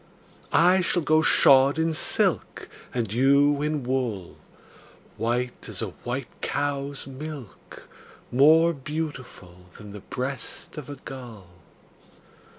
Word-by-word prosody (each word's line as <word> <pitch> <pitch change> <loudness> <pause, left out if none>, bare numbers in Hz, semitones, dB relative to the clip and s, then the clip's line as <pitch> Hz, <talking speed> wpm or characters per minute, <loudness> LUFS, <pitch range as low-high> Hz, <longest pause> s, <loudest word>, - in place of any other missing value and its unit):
I 180 +2 +4
shall 175 -1 +1
go 155 +1 +3
shod 140 -2 +5
in 160 0 0
silk, - - 0 0.2
And 115 -4 -3
you 140 +3 +3
in 150 -2 -1
wool, 120 -8 -3 0.8
White 120 +3 -2
as - - -3
a - - -2
white - - -5
cow's 140 -1 -2
milk, 135 -3 -10 0.4
More 160 +6 +5
beautiful 130 - -7
Than 105 -1 -11
the 105 - -9
breast 130 +5 -5
of 145 - -10
a 145 - -6
gull. 120 -8 -10
135 Hz, 115 wpm, -25 LUFS, 120-150 Hz, 0.8 s, shod